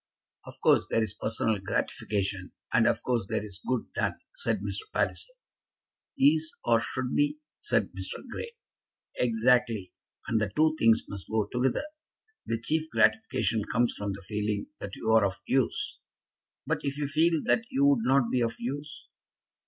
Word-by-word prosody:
"Of - - -10
course - - +5
there 115 - +2
is 105 -3 -3
personal 110 0 0
gratification, 95 0 -2 0.2
and - - +5
of - - +1
course 120 -5 0
there 105 - -1
is 100 -1 -9
good 125 -2 -1
done," - - 0 0.2
said 485 - 0
Mr. 435 -1 -5
Palliser. - - -1 0.8
"Is, 155 +3 +3
or 115 -1 +4
should 130 +2 -3
be," 290 +1 +2 0.2
said - - +1
Mr. - - -6
Grey. 465 - -6 0.7
"Exactly; 115 -4 +2 0.3
and 110 - +1
the 105 -2 -1
two 155 +1 +4
things 115 0 +5
must 100 -5 -8
go 110 -1 +1
together. 125 - 0 0.6
The 115 - -1
chief 155 +7 -1
gratification 220 - +2
comes 120 +1 +2
from 100 -1 -3
the 100 0 -9
feeling 105 +1 -2
that 100 - -6
you 110 - -1
are 110 -1 +6
of 100 -1 -1
use." 130 -2 0 0.7
"But - - 0
if 140 0 -3
you 145 -1 -1
feel 160 +3 +3
that 230 - +2
you 275 +2 +2
would 280 -4 +4
not 135 - +3
be 125 - +2
of 115 -1 0
use?" 145 +5 -6
120 Hz, 165 wpm, -28 LUFS, 105-150 Hz, 0.8 s, are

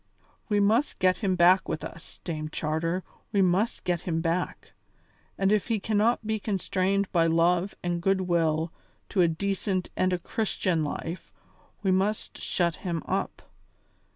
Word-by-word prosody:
We 205 -1 +3
must 220 +8 +2
get 185 0 +3
him 195 -4 0
back 180 +2 +5
with - - -3
us, 165 - -9
Dame 155 -3 -4
Charter, 165 +4 -1 0.3
we 200 -2 +3
must 185 +6 +1
get 175 -2 0
him 165 -2 -1
back. 165 +2 -2 0.6
And 195 0 +2
if 210 -2 +2
he 225 -3 +1
cannot 220 +3 +1
be 220 0 0
constrained 195 -1 0
by 165 -2 +3
love 175 +3 +2
and 175 -1 -1
goodwill 170 -4 +1 0.4
to 190 - +2
a 175 - +5
decent 190 +2 -1
and 185 0 +2
a 180 - +1
Christian 180 -3 -1
life, 165 +4 -5 0.5
we 190 - +3
must 195 +3 0
shut 170 -3 0
him 170 -4 -3
up. - - -2
185 Hz, 155 wpm, -27 LUFS, 170-200 Hz, 0.6 s, back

